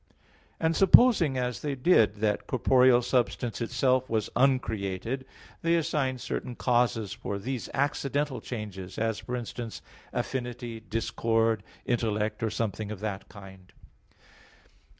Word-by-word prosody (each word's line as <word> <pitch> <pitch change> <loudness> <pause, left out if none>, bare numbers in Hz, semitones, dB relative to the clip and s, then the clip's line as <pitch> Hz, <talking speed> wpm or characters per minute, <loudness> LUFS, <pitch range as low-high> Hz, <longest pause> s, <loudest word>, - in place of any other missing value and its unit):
And 165 0 +1
supposing 190 - +6
as 125 -1 -2
they 145 -2 -2
did 125 - +4
that 105 -2 0
corporeal 125 0 +4
substance 120 -1 0
itself 125 +2 +1
was 110 -2 -1
uncreated, 120 -2 0 0.4
they 165 0 +2
assigned 150 -6 0
certain 125 -1 -4
causes 120 -5 +1
for 105 -3 -4
these 125 +4 -4
accidental 140 0 -1
changes, 100 -6 -7
as 110 -1 -1
for 125 - -5
instance, 120 -1 -5 0.3
affinity, 120 -2 -4
discord, 115 0 0 0.2
intellect, 110 -3 -1
or 110 - +1
something 110 -1 -3
of 105 - -6
that 105 -3 -4
kind. 95 -1 -13
120 Hz, 120 wpm, -28 LUFS, 110-130 Hz, 0.4 s, supposing